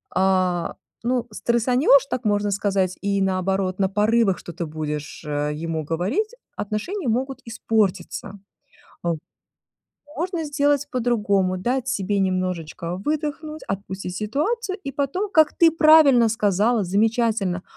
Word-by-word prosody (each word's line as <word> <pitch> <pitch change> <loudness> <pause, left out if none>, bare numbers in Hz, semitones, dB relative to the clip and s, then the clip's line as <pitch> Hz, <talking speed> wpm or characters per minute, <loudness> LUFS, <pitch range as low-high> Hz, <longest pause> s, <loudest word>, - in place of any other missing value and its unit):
а, 185 -2 +1 0.3
ну, 245 0 0
стрессанешь, 245 +5 +3
так 255 - -3
можно 205 0 +1
сказать, 195 -2 0
и 200 0 0
наоборот, 190 0 0
на 190 -1 +2
порывах 210 0 +2
что-то 170 0 -6
будешь, 150 0 -5
э, 150 0 -1
ему 160 +1 -3
говорить, 195 - -1 0.2
отношения 240 - -3
могут 265 +3 -2
испортиться, 205 -4 -1 0.6
а, 170 -1 0
в - - -7 1.0
Можно 345 0 -2
сделать 290 -1 +1
по-другому, 205 -6 +1
дать 245 +6 -1
себе 205 -5 0
немножечко 180 -2 -2
выдохнуть, 305 0 -3
отпустить 195 -2 -5
ситуацию 360 - -2
и 275 - -4
потом, 285 +10 -2
как 315 -4 +4
ты 335 -1 +7
правильно 310 -7 +6
сказала, 215 +1 +2
замечательно, 210 -1 +1
210 Hz, 120 wpm, -23 LUFS, 185-265 Hz, 1.0 s, ты